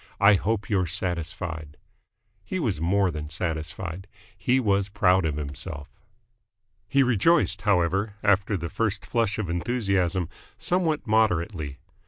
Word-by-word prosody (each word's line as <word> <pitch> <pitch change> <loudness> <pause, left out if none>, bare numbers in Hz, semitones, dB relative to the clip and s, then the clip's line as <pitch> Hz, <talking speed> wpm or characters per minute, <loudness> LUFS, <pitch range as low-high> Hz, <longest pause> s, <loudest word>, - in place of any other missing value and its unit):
I 100 +1 +7
hope 100 +1 0
you're 95 -4 +1
satisfied!" 85 -3 -3 0.7
He 185 - -3
was 110 - -1
more 95 +2 +2
than 75 -1 -6
satisfied. 80 +3 -4 0.3
He 125 +8 +2
was 100 -4 +1
proud 95 -3 +3
of 75 -3 0
himself. 70 0 -6 1.0
He 140 0 +4
rejoiced, 125 - +3
however, 100 +1 +1
after 100 0 +2
the 85 -1 -5
first 110 -3 -1
flush 115 -3 0
of 110 -4 -2
enthusiasm, 95 -2 0 0.3
somewhat 170 -4 0
moderately. 90 -9 +1
95 Hz, 125 wpm, -26 LUFS, 85-110 Hz, 1.0 s, I